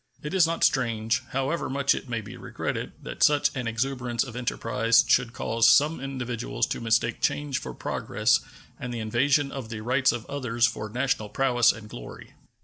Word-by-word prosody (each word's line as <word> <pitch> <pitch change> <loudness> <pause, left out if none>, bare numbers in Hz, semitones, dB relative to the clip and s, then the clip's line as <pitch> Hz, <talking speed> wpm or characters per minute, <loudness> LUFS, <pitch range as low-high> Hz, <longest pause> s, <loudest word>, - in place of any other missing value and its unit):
It 150 - -5
is 180 -4 +5
not 165 0 -2
strange, 115 -2 +1
however 135 +5 -1
much 140 +1 +2
it 135 - -6
may 115 -2 -2
be 105 - -10
regretted, - - -4
that - - -8
such 145 -1 +4
an 125 -3 -3
exuberance 120 +1 -1
of 125 -3 -9
enterprise 115 -1 +2
should 115 - +3
cause 115 -1 +2
some 150 +5 +4
individuals 125 - -3
to - - -3
mistake 115 0 +1
change 145 -3 0
for 65 -1 -8
progress - - +1 0.4
and 125 - -5
the 120 - -4
invasion 140 +6 +1
of 130 -5 -6
the 110 -2 -6
rights 130 +3 +2
of 120 -1 -5
others 120 -4 0
for 105 -2 -3
national 120 -2 -1
prowess 120 0 +3
and 110 -1 -10
glory. - - -10
120 Hz, 180 wpm, -26 LUFS, 115-135 Hz, 0.4 s, is